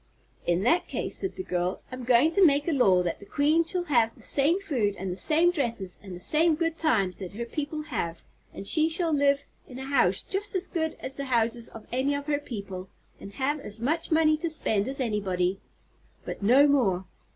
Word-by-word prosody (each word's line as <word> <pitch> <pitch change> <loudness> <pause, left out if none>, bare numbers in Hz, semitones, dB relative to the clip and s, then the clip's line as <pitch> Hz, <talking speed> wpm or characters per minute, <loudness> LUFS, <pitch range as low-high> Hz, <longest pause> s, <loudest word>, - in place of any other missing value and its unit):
"In 175 +2 +1
that 340 +9 +2
case," - - -4
said 385 - -3
the 375 - -5
girl, 180 - -2
"I'm 255 -1 -7
goin' 255 +6 +4
to 395 +2 +3
make 290 -2 +4
a - - +2
law 195 - +3
that 175 - -3
the - - -12
Queen 305 +4 +2
shall 355 +2 -2
have 235 -8 +1
the - - -18
same 300 +7 +3
food 250 - -1
an' 190 -1 -5
the - - -4
same 320 - +4
dresses 235 - -1
an' 190 -3 -9
the - - -9
same 315 - +3
good 330 0 -1
times 215 - 0
that 190 -1 -7
her 235 +3 -5
people 300 +4 -4
have; 170 - -4 0.3
and 195 - -9
she 315 +9 +4
shall 330 0 +1
live 280 -1 +2 0.2
in 255 - -10
a 265 - -6
house 245 -10 +2
jus' 400 +1 -1
as 375 0 +1
good 320 -2 -3
as 265 - -5
the 275 +1 -5
houses 235 -2 +1
of 225 - -12
any 265 +3 0
of 285 0 -4
her 290 -1 0
people, 195 -8 -7 0.3
an' - - -9
have 270 +8 -2
as 210 -5 -5
much 310 +8 -1
money 315 -1 +3
to 335 +2 -3
spend 220 -9 0
as 275 +1 -2
anybody. 195 -6 -1 0.7
But - - -6
no 255 +8 +5
more. 200 -10 +1
270 Hz, 220 wpm, -27 LUFS, 200-315 Hz, 0.7 s, no